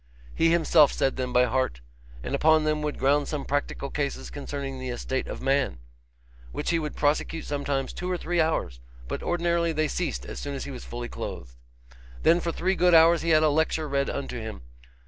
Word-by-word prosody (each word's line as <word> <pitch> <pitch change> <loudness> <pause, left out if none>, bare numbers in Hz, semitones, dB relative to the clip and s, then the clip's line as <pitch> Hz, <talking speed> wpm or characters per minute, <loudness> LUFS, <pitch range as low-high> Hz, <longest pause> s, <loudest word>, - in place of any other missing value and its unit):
He 165 - +3
himself 160 -3 +5
said 135 - 0
them 125 -1 -3
by 125 0 +5
heart, 115 - -1 0.4
and - - -4
upon 155 +2 +4
them 155 0 0
would 150 -1 -3
ground 145 +2 +2
some 150 -3 -4
practical 140 -1 -2
cases 140 - -3
concerning 135 - -5
the 130 0 -5
estate 130 +2 -3
of - - -6
man, 135 - +1 0.7
which 60 - -2
he 165 - +2
would 150 -2 -4
prosecute 155 +2 0
sometimes 140 -2 -2
two 180 - -4
or 180 - 0
three 175 0 0
hours, 155 - -1 0.3
but - - -4
ordinarily 170 -1 0
they 155 0 +1
ceased 165 -2 -3
as - - -7
soon 145 -1 -4
as 135 - -4
he - - -6
was 130 - -8
fully 120 0 -5
clothed. - - -7 0.7
Then 170 - +5
for 170 -1 -2
three 185 +3 0
good 180 -2 +4
hours 165 +1 +6
he 170 - -1
had 155 -1 +5
a 155 - +5
lecture 160 +1 +1
read 140 -1 0
unto 135 -3 -4
him. 110 - -7
145 Hz, 205 wpm, -26 LUFS, 135-165 Hz, 0.7 s, hours